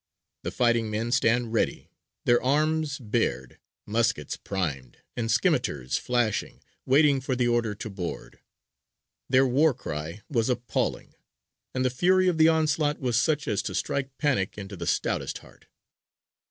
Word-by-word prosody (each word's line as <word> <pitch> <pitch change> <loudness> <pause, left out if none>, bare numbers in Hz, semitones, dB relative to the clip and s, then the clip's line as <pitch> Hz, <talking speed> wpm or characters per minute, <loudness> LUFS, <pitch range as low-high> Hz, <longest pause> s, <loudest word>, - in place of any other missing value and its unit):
The - - -3
fighting 120 -2 +1
men 110 +3 -2
stand 120 -1 +2
ready, 115 - -1 0.3
their 120 0 +4
arms 150 +2 +1
bared, 105 - -2 0.3
muskets 110 - 0
primed, 75 -10 -4 0.2
and 115 -2 -2
scimitars 75 - +1
flashing, 120 -4 -1 0.2
waiting 140 0 +4
for 130 0 -1
the 125 -1 +1
order 120 -3 +1
to 105 - -6
board. 95 -4 -6 0.9
Their 130 +1 +5
war 135 +3 +3
cry 80 - -6
was 115 -3 0
appalling; 125 -1 -2 0.6
and 130 0 0
the 130 - +2
fury 185 +8 +3
of 175 -3 +1
the 160 - +7
onslaught 155 -2 +1
was 125 -4 -1
such 150 +4 +1
as 105 -5 0
to - - -5
strike 135 -1 -2
panic 125 -12 0
into 100 -1 -7
the 85 -2 -6
stoutest - - -1
heart. - - -18
120 Hz, 145 wpm, -26 LUFS, 105-140 Hz, 0.9 s, the